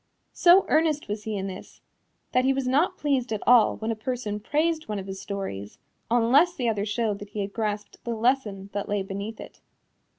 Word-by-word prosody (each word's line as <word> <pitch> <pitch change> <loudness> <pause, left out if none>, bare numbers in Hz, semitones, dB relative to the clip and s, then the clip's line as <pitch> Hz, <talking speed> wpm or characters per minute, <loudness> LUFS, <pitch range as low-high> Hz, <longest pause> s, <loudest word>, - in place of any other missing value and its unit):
So 365 +2 +6
earnest 310 -1 +2
was 210 0 -4
he 215 -2 -2
in 195 - -3
this 190 -1 -8 0.5
that 255 - +3
he 270 +1 +3
was 270 -1 -2
not 335 +9 +2
pleased 270 -5 0
at 215 - -2
all 240 -3 +6
when 220 +1 -2
a - - -1
person 220 -2 -3
praised 315 +7 0
one 210 - -2
of 195 - -5
his 195 0 -7
stories, 150 - -5 0.3
unless 255 +9 +4
the 245 - -1
other 210 -2 0
showed 210 -1 -1
that 205 -1 -9
he 210 - -4
had 200 0 -4
grasped 210 -2 -4
the 235 -1 -3
lesson 220 -5 0
that 200 0 -3
lay 205 -1 0
beneath 200 +3 -6
it. - - -11
220 Hz, 205 wpm, -26 LUFS, 205-265 Hz, 0.5 s, So